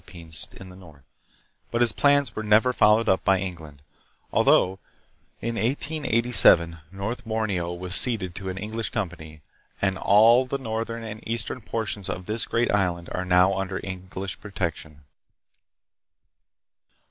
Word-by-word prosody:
273 85 -3 -11
pines 80 -1 -5
in 95 - -10
the 90 - -13
north; 80 -7 -16 0.6
but 120 - -1
his 120 -2 +4
plans 140 -2 +2
were - - -3
never 110 +4 +3
followed 110 0 +3
up 95 - +2
by 95 - +3
England, 80 -6 -8 0.5
although 95 +1 +3 0.6
in 115 +1 -2
1887 115 - +3
North 100 +5 -5
Borneo 110 -6 -2
was 90 +1 -6
ceded 100 -6 +2
to 95 0 -6
an 95 - -5
English 110 +3 -4
company, 80 -5 -6 0.4
and 95 -1 -1
all 115 +5 +5
the 140 - -2
northern 115 -2 -4
and 110 0 -8
eastern 115 +2 -3
portions 105 -3 -2
of 90 - -5
this 110 +3 -2
great 120 +1 0
island 90 -4 -1
are 90 - -3
now 90 +1 +4
under 95 0 -3
English 95 0 -6
pro 105 - -10
tection. 80 -6 -5
100 Hz, 145 wpm, -24 LUFS, 90-115 Hz, 0.6 s, all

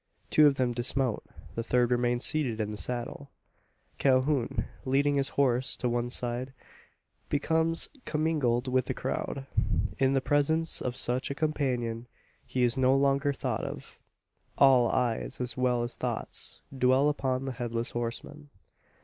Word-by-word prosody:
Two 155 -1 +7
of 140 - +3
them 125 -2 0
dismount; 125 0 -1 0.3
the 115 - -2
third 120 +1 +1
remains 120 0 +1
seated 130 -8 +1
in 105 -1 -1
the - - -4
saddle. 125 +4 -2 0.7
Calhoun, 130 -1 +2 0.2
leading 140 +2 +2
his 140 -1 +1
horse 130 -2 +2
to 125 - -1
one 120 0 -1
side, 125 +1 -3 0.8
becomes 160 +3 +1 0.2
commingled 150 -6 0
with 130 0 +1
the - - -3
crowd. 135 -1 -3 0.5
In 135 0 +3
the 135 - +3
presence 145 +4 +1
of 125 -1 -2
such 125 +2 0
a 140 - -3
companion, 125 -7 -1 0.4
he 125 - 0
is 120 0 +2
no 130 0 +3
longer 140 +1 +2
thought 140 - -3
of. - - -7 0.6
All 130 -4 +6
eyes, 125 +1 -1
as 125 -1 -3
well 125 -2 +1
as 120 - -3
thoughts, - - -3
dwell 130 +2 +4
upon 135 -3 0
the 135 - -2
Headless 120 -1 -3
Horseman. 120 +5 -5
130 Hz, 150 wpm, -29 LUFS, 120-140 Hz, 0.8 s, Two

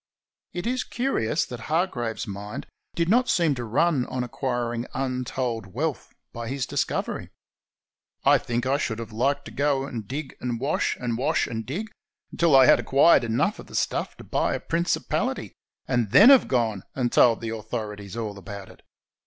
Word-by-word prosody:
It 175 - -5
is 250 +1 0
curious 170 - 0
that 125 - -8
Hargraves's 150 -9 -1
mind 105 +4 -6 0.3
did 170 -1 +1
not 245 +6 +3
seem 165 -4 +3
to 125 -3 -4
run 135 +4 +1
on 125 -1 -2
acquiring 120 -1 -2
imtold 125 -4 -2
wealth 140 +9 -3 0.2
by 115 -1 -5
his 135 0 -2
discovery. - - -2 1.0
I - - +6
think 120 +1 -2
I 135 +2 +2
should 110 -6 -2
have 115 -1 -7
liked 135 +6 0
to - - -9
go 140 -1 +1
and 115 -7 -6
dig 145 +1 -5
and 120 -2 -2
wash, 140 +5 0
and 120 -2 -2
wash 130 - +1
and 110 -1 -5
dig, 205 +11 -4 0.4
until 170 -4 +3
I 135 -1 +8
had - - +6
acquired 140 0 +5
enough 120 - 0
of - - -10
the - - -10
stuff - - -1
to - - -11
buy - - 0
a - - -3
principality, 170 +1 -1 0.3
and 120 -5 +1
then 220 - +8
have 270 - +6
gone 115 -6 0
and 125 -2 0
told 115 -2 +5
the 115 - -4
authorities 110 -2 -5
all 105 -3 -4
about 100 +1 -8
it. - - -16
125 Hz, 175 wpm, -25 LUFS, 115-145 Hz, 1.0 s, I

